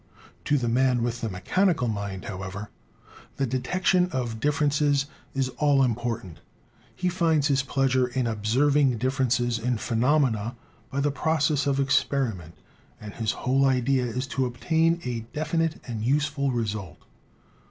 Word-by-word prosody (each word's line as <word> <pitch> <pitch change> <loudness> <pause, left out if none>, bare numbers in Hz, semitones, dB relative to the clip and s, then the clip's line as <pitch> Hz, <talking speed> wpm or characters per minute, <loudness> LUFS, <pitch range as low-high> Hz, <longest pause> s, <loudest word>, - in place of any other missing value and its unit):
To 145 - +2
the 120 -3 -1
man 125 0 +2
with 120 0 -2
the 115 - -2
me 95 -2 -7
chanical 175 - +2
mind, 100 -3 -4
however, 95 0 -6 0.7
the 135 - +1
detection 180 +8 +1
of 120 -4 -3
differences 145 0 +2 0.3
is 135 -1 0
all 145 -2 +4
important. 115 -8 -2 0.6
He 180 - -2
finds 165 -5 +2
his 140 -1 +3
pleasure 135 -2 +1
in 125 0 -1
observing 125 +5 +2
differ 130 +3 0
ences 120 -2 0
in 125 -1 +1
phenomena 120 -1 +1 0.3
by 140 - -2
the 145 +1 +1
process 150 -1 +1
of 140 -1 +1
experiment, 125 - 0 0.4
and 105 -1 -9
his 110 -2 -1
whole 135 +1 +1
idea 130 -1 +2
is 125 +2 -3
to 130 -2 0
obtain 160 +7 +1
a 120 -2 -2 0.2
definite 165 +1 -1
and 115 -3 -4
useful 140 +2 +1
result. 110 -6 -3
130 Hz, 145 wpm, -26 LUFS, 115-145 Hz, 0.7 s, all